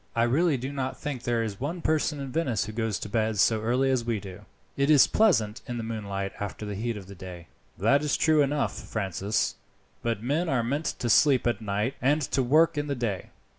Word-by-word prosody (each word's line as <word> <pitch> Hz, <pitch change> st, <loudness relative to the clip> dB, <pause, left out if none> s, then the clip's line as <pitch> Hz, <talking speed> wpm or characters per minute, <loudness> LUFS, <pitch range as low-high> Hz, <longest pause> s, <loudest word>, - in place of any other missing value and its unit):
I 115 Hz, -, +3 dB
really 145 Hz, +5 st, +2 dB
do 130 Hz, +3 st, -5 dB
not 130 Hz, -2 st, -3 dB
think 140 Hz, -4 st, -4 dB
there 120 Hz, -1 st, 0 dB
is 105 Hz, -3 st, -5 dB
one 160 Hz, +6 st, -4 dB
person 155 Hz, -1 st, +1 dB
in 135 Hz, -2 st, -5 dB
Venice 130 Hz, -, 0 dB
who 110 Hz, -, -6 dB
goes 110 Hz, -2 st, -1 dB
to -, -, -6 dB
bed 110 Hz, 0 st, 0 dB
so 110 Hz, +2 st, +3 dB
early 125 Hz, +4 st, +1 dB
as 130 Hz, -3 st, +1 dB
we 115 Hz, -2 st, -1 dB
do. 100 Hz, +1 st, -10 dB, 0.3 s
It 140 Hz, +1 st, +1 dB
is 145 Hz, -4 st, +8 dB
so -, -, +1 dB
pleasant 120 Hz, -, +3 dB
in 120 Hz, -, -4 dB
the 115 Hz, -, -3 dB
moonlight 100 Hz, -3 st, -4 dB
after 100 Hz, +1 st, -5 dB
the 105 Hz, -, -4 dB
heat 115 Hz, +2 st, -3 dB
of 100 Hz, -, -9 dB
the 100 Hz, -, -11 dB
day." 90 Hz, -2 st, -9 dB, 0.3 s
"That 135 Hz, +9 st, +3 dB
is 150 Hz, -1 st, 0 dB
true 155 Hz, -1 st, +4 dB
enough, 145 Hz, 0 st, 0 dB
Francis, 100 Hz, 0 st, -2 dB, 0.4 s
but 115 Hz, -2 st, -2 dB
men 155 Hz, +7 st, 0 dB
are 125 Hz, -5 st, +1 dB
meant 140 Hz, +7 st, -2 dB
to 120 Hz, -, -3 dB
sleep 130 Hz, +2 st, +5 dB
at 120 Hz, -1 st, 0 dB
night 105 Hz, +4 st, -1 dB
and 145 Hz, +4 st, +2 dB
to 135 Hz, -, +3 dB
work 155 Hz, +5 st, +3 dB
in 145 Hz, -, -3 dB
the 140 Hz, -, -1 dB
day. 115 Hz, -7 st, -3 dB
120 Hz, 230 wpm, -27 LUFS, 105-140 Hz, 0.4 s, is